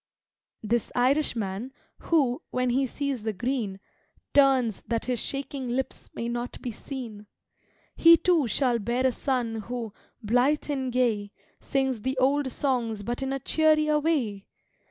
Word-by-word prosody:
This 230 +2 0
Irishman, 245 -4 0 0.3
who, 275 -7 +1
when 255 -1 0
he 265 +2 +2
sees 280 -2 -3
the 220 0 -2
Green, 215 -2 -2 0.5
Turns 265 -6 +4
that 230 0 -1
his 250 -2 -1
shaking 275 -1 -4
lips 255 +2 -3
may 230 - -3
not 240 +1 -4
be 245 - -4
seen, 225 -4 -8 0.7
He, 335 0 +8
too, 335 -8 +2
shall 245 0 +1
bear 240 +4 0
a 260 - +4
son 245 -3 -1
who, 235 -3 -4 0.3
blythe 250 +8 +2
and 265 -3 -2
gay, 225 -5 +1 0.3
Sings 265 -5 -1
the 260 +3 -2
old 270 +1 +2
songs 235 -6 -1
but 240 +4 -3
in 270 0 -2
a 275 - 0
cheerier 305 +1 +3
way! 255 -11 -1
255 Hz, 145 wpm, -27 LUFS, 230-275 Hz, 0.7 s, He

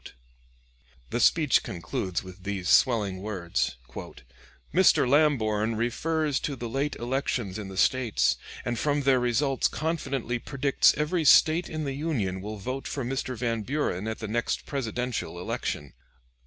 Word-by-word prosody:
] - - -33
The - - 0
speech 150 +2 +4
concludes 90 +1 -3
with 95 0 -11
these 95 -2 -4
swelling 105 -7 +3
words: 90 -9 -2 1.0
"Mr. 180 -6 +5
Lamborn 115 -7 +2
refers 150 +6 0
to 145 - -3
the 120 -2 -5
late 135 +5 -1
elections 120 -5 -2
in 105 - -6
the 95 -1 -8
States, 125 0 +2 0.3
and 120 -1 -2
from 145 -1 +1
their 135 -1 +4
results 125 +3 +1
confidently 135 -7 -2
predicts 140 +2 +2
every 160 +3 0
State 160 +4 +5
in 155 -1 -3
the 140 -2 -2
Union 125 - -2
will 105 +2 -6
vote 130 +7 -4
for 135 -4 -3
Mr. 130 0 -3
Van 115 -1 -1
Buren 110 -5 -2
at 110 - -3
the 110 - -5
next 115 +3 -1
Presidential 125 -7 -3
election. 75 -5 -4
120 Hz, 145 wpm, -27 LUFS, 100-140 Hz, 1.0 s, Mr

